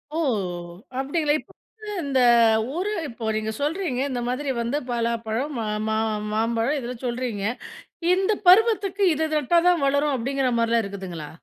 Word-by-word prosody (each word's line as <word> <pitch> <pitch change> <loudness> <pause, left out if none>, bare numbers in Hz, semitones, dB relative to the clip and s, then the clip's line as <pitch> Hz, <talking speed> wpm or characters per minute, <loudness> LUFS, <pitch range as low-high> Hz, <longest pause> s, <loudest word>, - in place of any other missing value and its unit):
ஓ! - - -1 0.8
அப்டிங்களா? 295 +2 0
இப்ப - - -17 0.3
வந்து 430 - -10 0.2
இந்த 275 -2 0 0.6
ஊரு 385 +5 -1 0.2
இப்போ 230 -3 -7
நீங்க 220 0 -2
சொல்றீங்க, 300 -3 -1
இந்த 245 -2 -2
மாதிரி 270 +3 -2
வந்து 235 +5 -1
பலாப்பழம் 235 +3 -1
மா 220 - -2 0.2
மா 220 0 0 0.4
மாம்பழம் 230 +5 +1
இதெல்லாம் 250 -1 -6
சொல்றீங்க. 240 -4 -3 0.7
இந்த 385 +3 +2
பருவத்துக்கு 400 0 +5
இது 315 +2 -1
இது 310 - +1
நட்டா 340 +4 +3
தான் 350 -4 +2
வளரும், 285 +1 +2
அப்டிங்கிற 265 +1 0
மாரிலாம் 230 0 +2
இருக்குதுங்களா? 185 -6 -7
260 Hz, 145 wpm, -24 LUFS, 230-310 Hz, 0.8 s, பருவத்துக்கு